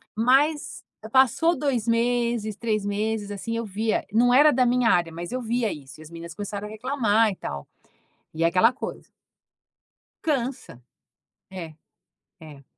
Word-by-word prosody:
Mas 275 Hz, +7 st, +2 dB, 0.3 s
passou 270 Hz, +6 st, +4 dB
2 250 Hz, -6 st, -1 dB
meses, 235 Hz, -2 st, 0 dB
3 215 Hz, -3 st, -1 dB
meses, 205 Hz, 0 st, -2 dB
assim, 230 Hz, +3 st, -4 dB
eu 230 Hz, -, -3 dB
via 215 Hz, +2 st, -1 dB
não 245 Hz, +3 st, +4 dB
era 295 Hz, +3 st, +7 dB
da 255 Hz, 0 st, +2 dB
minha 245 Hz, -1 st, +3 dB
área, 170 Hz, -2 st, +2 dB
mas 170 Hz, +5 st, -7 dB
eu 255 Hz, -, -2 dB
via 235 Hz, -2 st, -1 dB
isso. 140 Hz, 0 st, -10 dB
E -, -, -10 dB
as 155 Hz, -, -13 dB
meninas 170 Hz, 0 st, -8 dB
começaram 205 Hz, +1 st, -5 dB
a -, -, -10 dB
reclamar 225 Hz, -2 st, +1 dB
e -, -, -6 dB
tal. 70 Hz, -, -7 dB, 0.7 s
E 165 Hz, +1 st, -1 dB
é -, -, +5 dB
aquela 185 Hz, +8 st, +4 dB
coisa. 275 Hz, -, -7 dB, 1.2 s
Cansa! 260 Hz, -, -3 dB, 0.7 s
É, 170 Hz, -5 st, -8 dB, 0.7 s
é, 150 Hz, -3 st, -13 dB
225 Hz, 155 wpm, -25 LUFS, 190-245 Hz, 1.2 s, era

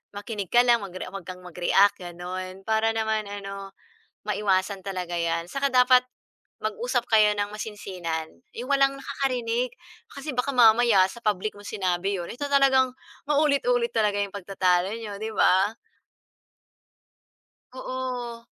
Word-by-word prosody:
makinig 205 Hz, -1 st, -5 dB
ka 240 Hz, -, +7 dB
lang 240 Hz, -1 st, +4 dB
magre-a 185 Hz, -2 st, -7 dB
'wag 195 Hz, -3 st, -8 dB
kang 185 Hz, 0 st, -8 dB
mag-react 180 Hz, +3 st, +3 dB
gano'n. 185 Hz, +2 st, -7 dB
Para 220 Hz, +1 st, +1 dB
naman 220 Hz, -1 st, 0 dB
ano, 195 Hz, -1 st, -7 dB, 0.5 s
maiwasan 195 Hz, -1 st, 0 dB
talaga 180 Hz, -3 st, -4 dB
'yan. 170 Hz, 0 st, -1 dB
Saka 275 Hz, +6 st, -1 dB
dapat 250 Hz, 0 st, +6 dB, 0.6 s
mag-usap 465 Hz, -, -1 dB
kayo 215 Hz, -1 st, +5 dB
nang 205 Hz, +1 st, -2 dB
masinsinan, 185 Hz, -7 st, -5 dB, 0.3 s
'yong 245 Hz, +3 st, -6 dB
walang 275 Hz, 0 st, +4 dB
nakakarinig. 250 Hz, -3 st, -2 dB, 0.4 s
Kasi 280 Hz, +1 st, -6 dB
baka 250 Hz, +2 st, -1 dB
mamaya 225 Hz, -4 st, +6 dB
sa 235 Hz, -, -12 dB
public 210 Hz, -1 st, -1 dB
mo 205 Hz, -, -12 dB
sinabi 190 Hz, -1 st, -1 dB
'yon, 175 Hz, -, -6 dB
ito 285 Hz, +5 st, -4 dB
talagang 265 Hz, -2 st, +4 dB, 0.4 s
maulit-ulit 310 Hz, -, +2 dB
talaga 210 Hz, -2 st, +1 dB
'yong 200 Hz, -1 st, -2 dB
pagtatalo 185 Hz, -1 st, +1 dB
n'yo, 210 Hz, -3 st, -7 dB
'di 220 Hz, -, -3 dB
ba? 195 Hz, +4 st, +4 dB, 2.0 s
Oo. 250 Hz, -2 st, -5 dB
210 Hz, 130 wpm, -25 LUFS, 190-245 Hz, 2.0 s, ka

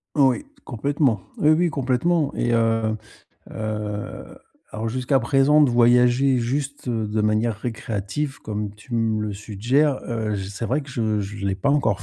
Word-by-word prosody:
Oui, 135 Hz, -, +3 dB, 0.2 s
complètement, 140 Hz, -1 st, 0 dB, 0.2 s
oui, 150 Hz, -, +4 dB
oui, 170 Hz, +2 st, +3 dB
complètement 145 Hz, +3 st, 0 dB
et 120 Hz, -, 0 dB
heu 115 Hz, -1 st, +1 dB, 0.5 s
heu, 105 Hz, -1 st, -5 dB, 0.3 s
alors 110 Hz, +1 st, -3 dB
jusqu'à 130 Hz, +3 st, +1 dB
présent, 140 Hz, +5 st, +4 dB
de 140 Hz, -, +4 dB
voyager 125 Hz, +2 st, +4 dB
juste 135 Hz, +3 st, -3 dB
de 110 Hz, -2 st, -1 dB
manière 110 Hz, +1 st, +1 dB
récréative, 115 Hz, +4 st, -4 dB
comme 105 Hz, -1 st, -4 dB
tu 105 Hz, +3 st, -9 dB
me 110 Hz, -2 st, +1 dB
le 105 Hz, -1 st, -3 dB
suggères, 120 Hz, +8 st, 0 dB
heu, 110 Hz, -3 st, -2 dB
c'est 100 Hz, +3 st, -5 dB
vrai 140 Hz, +6 st, 0 dB
que 140 Hz, -, -12 dB
je 110 Hz, -4 st, 0 dB
je 100 Hz, 0 st, -5 dB
l'ai 95 Hz, -, 0 dB
pas 95 Hz, +9 st, 0 dB
encore 135 Hz, -9 st, +1 dB
115 Hz, 155 wpm, -23 LUFS, 105-135 Hz, 0.5 s, oui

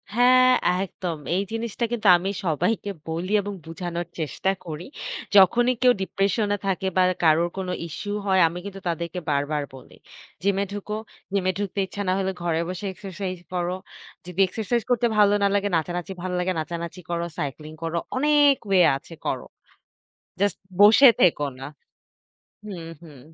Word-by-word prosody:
হ্যাঁ, 255 Hz, +1 st, +6 dB, 0.3 s
একদম। 175 Hz, -3 st, -5 dB, 0.2 s
এই 195 Hz, -, +1 dB
জিনিসটা 230 Hz, +1 st, -2 dB
কিন্তু 220 Hz, -4 st, 0 dB
আমি 190 Hz, +3 st, -3 dB, 0.2 s
সবাইকে 200 Hz, +6 st, 0 dB, 0.2 s
বলি 170 Hz, +4 st, -3 dB
এবং 205 Hz, 0 st, -5 dB
বুঝানোর 175 Hz, 0 st, -5 dB
চেষ্টা 160 Hz, +5 st, -1 dB
করি। 160 Hz, +1 st, -6 dB, 0.5 s
যখনই 240 Hz, +6 st, +6 dB
কেউ 250 Hz, -1 st, +6 dB
ডিপ্রেশন 195 Hz, +3 st, 0 dB, 0.2 s
থাকে 190 Hz, 0 st, -1 dB
বা 185 Hz, -, +6 dB, 0.2 s
কারোর 165 Hz, +2 st, +4 dB
কোনো 185 Hz, -1 st, -3 dB, 0.2 s
ইশ্যু 205 Hz, +6 st, -7 dB, 0.2 s
হয় 190 Hz, -1 st, +3 dB
আমি 175 Hz, +2 st, -5 dB
কিন্তু 195 Hz, -1 st, -7 dB
তাদেরকে 170 Hz, +1 st, -3 dB
বারবার 145 Hz, +1 st, 0 dB
বলি। 130 Hz, -, -14 dB, 0.5 s
জিমে 200 Hz, 0 st, +2 dB
ঢুকো। 205 Hz, +1 st, -4 dB, 0.4 s
জিমে 185 Hz, -1 st, +2 dB
ঢুকতে 200 Hz, 0 st, -3 dB
ইচ্ছা 205 Hz, +2 st, -6 dB
না 185 Hz, -, +3 dB
হলে 190 Hz, 0 st, 0 dB
ঘরে 165 Hz, -1 st, 0 dB
বসে 185 Hz, +3 st, -5 dB
এক্সারসাইজ 190 Hz, -1 st, -6 dB, 0.2 s
করো। 180 Hz, 0 st, -1 dB, 0.5 s
যদি 180 Hz, +1 st, -8 dB
এক্সারসাইজ 225 Hz, +4 st, -1 dB
করতে 245 Hz, -1 st, +3 dB
ভালো 205 Hz, -1 st, +5 dB
না -, -, +5 dB
লাগে, 205 Hz, 0 st, +1 dB
নাচানাচি 175 Hz, +3 st, -2 dB
ভাল 185 Hz, 0 st, -3 dB
লাগে, 180 Hz, +1 st, 0 dB
নাচানাচি 170 Hz, +2 st, -5 dB
করো, 170 Hz, 0 st, -1 dB
সাইক্লিং 150 Hz, +2 st, -5 dB
করো। 165 Hz, +1 st, -2 dB, 0.2 s
অনেক 290 Hz, 0 st, +5 dB
ওয়ে 190 Hz, -2 st, +5 dB, 0.2 s
আছে 165 Hz, +3 st, -14 dB
করো। -, -, -2 dB, 1.0 s
জাস্ট 205 Hz, 0 st, +1 dB, 0.2 s
বসে 225 Hz, +6 st, +9 dB
থেকো 160 Hz, -5 st, +4 dB, 0.2 s
না। -, -, -6 dB, 1.0 s
হুম, 175 Hz, -6 st, -7 dB
হুম। 145 Hz, -6 st, -13 dB
185 Hz, 155 wpm, -24 LUFS, 170-205 Hz, 1.0 s, বসে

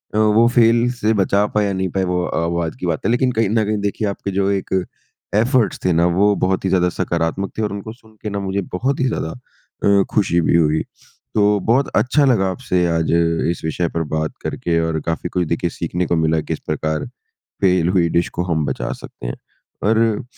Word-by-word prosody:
अ, -, -, +1 dB
वो 110 Hz, +2 st, +4 dB
फ़ेल 120 Hz, 0 st, +4 dB
से 110 Hz, +1 st, +3 dB
बचा 100 Hz, 0 st, +2 dB
पाया, 105 Hz, -2 st, +2 dB
नहीं 95 Hz, 0 st, -1 dB
पाया 95 Hz, +2 st, -1 dB
वो 90 Hz, 0 st, 0 dB
अ, 80 Hz, -1 st, -1 dB
वो 85 Hz, +1 st, -1 dB
आज 80 Hz, -2 st, -4 dB
की -, -, -4 dB
बात 80 Hz, -3 st, -2 dB
है -, -, +2 dB
लेकिन 125 Hz, +1 st, +2 dB
कहीं 115 Hz, -4 st, +1 dB
न 110 Hz, 0 st, +2 dB
कहीं 105 Hz, +1 st, 0 dB
देखिए 100 Hz, +1 st, -1 dB
आपके 100 Hz, 0 st, -4 dB
जो 100 Hz, +1 st, +1 dB
एक 95 Hz, -1 st, -2 dB, 0.6 s
एफ़र्ट्स 115 Hz, +2 st, +2 dB
थे 90 Hz, -, +3 dB
ना 85 Hz, +1 st, +3 dB
वो 105 Hz, 0 st, +4 dB
बहुत 95 Hz, 0 st, 0 dB
ही -, -, +2 dB
ज़्यादा 90 Hz, -1 st, +3 dB
सकारात्मक 85 Hz, +2 st, -2 dB
थे -, -, -1 dB
और 105 Hz, -, -1 dB
उनको 100 Hz, +2 st, -6 dB
सुन 110 Hz, -2 st, -22 dB
के 105 Hz, -, -2 dB
ना 100 Hz, 0 st, -3 dB
मुझे 100 Hz, 0 st, -2 dB
बहुत 130 Hz, +10 st, -1 dB
ही 130 Hz, -, +2 dB
ज़्यादा 80 Hz, -, -2 dB, 0.5 s
अ, 100 Hz, -1 st, +4 dB
खुशी 90 Hz, -5 st, +2 dB
भी 85 Hz, -, +2 dB
हुई। 80 Hz, -1 st, +2 dB, 0.5 s
तो 105 Hz, -1 st, +3 dB
बहुत 130 Hz, +5 st, +3 dB
अच्छा 140 Hz, +3 st, +3 dB
लगा 110 Hz, -8 st, +3 dB
आपसे 90 Hz, -5 st, 0 dB
आज 80 Hz, -1 st, 0 dB, 0.4 s
इस 85 Hz, -, -6 dB
विषय 85 Hz, +2 st, -1 dB
पर 85 Hz, 0 st, -2 dB
बात 80 Hz, 0 st, -1 dB
करके 85 Hz, -1 st, -1 dB
और 80 Hz, -1 st, -1 dB
काफ़ी 80 Hz, 0 st, -2 dB
कुछ 90 Hz, -2 st, -1 dB
देखिए 85 Hz, +2 st, -1 dB
सीखने 85 Hz, +2 st, -3 dB
को 85 Hz, -, +1 dB
मिला, 80 Hz, 0 st, +2 dB
किस -, -, -4 dB
प्रकार 75 Hz, 0 st, -1 dB, 0.6 s
फ़ेल 90 Hz, -3 st, +3 dB
हुई 90 Hz, -2 st, +2 dB
डिश 85 Hz, +1 st, +1 dB
को -, -, +2 dB
हम 80 Hz, -4 st, 0 dB
बचा -, -, -3 dB
सकते -, -, -9 dB
हैं। -, -, -4 dB, 0.5 s
और 110 Hz, +1 st, +2 dB
95 Hz, 220 wpm, -19 LUFS, 85-110 Hz, 0.6 s, वो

